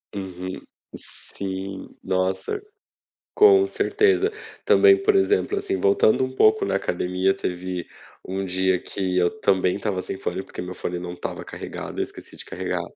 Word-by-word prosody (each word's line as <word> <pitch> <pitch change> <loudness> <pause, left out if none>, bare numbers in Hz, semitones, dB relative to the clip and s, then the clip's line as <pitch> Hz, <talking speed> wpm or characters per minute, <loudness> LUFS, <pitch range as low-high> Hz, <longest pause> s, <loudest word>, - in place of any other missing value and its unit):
Uhum, 95 -1 -6 0.3
sim, 95 0 -6
nossa, 95 - -1 0.7
com 410 -3 +7
certeza, 405 +1 +2 0.4
também, 390 -1 +6
por 420 0 +3
exemplo, 410 +1 +2
assim, 385 -1 -1
voltando 415 - +4
um 130 0 -8
pouco 110 -5 +4
na 100 - 0
academia, 90 0 0
teve 90 -2 -4 0.4
um 95 +1 -2
dia 95 0 +1
que 95 -2 -3
eu 90 -1 +4
também 95 -3 +2
estava 100 -2 -2
sem 95 - -4
fone, 95 0 -3
porque - - -8
meu 90 0 -6
fone 90 0 -3
não 90 0 -6
estava 90 - -6
carregado. - - -7
Eu - - +2
esqueci - - -10
de - - -6
carregar - - -3
95 Hz, 155 wpm, -24 LUFS, -, 0.7 s, com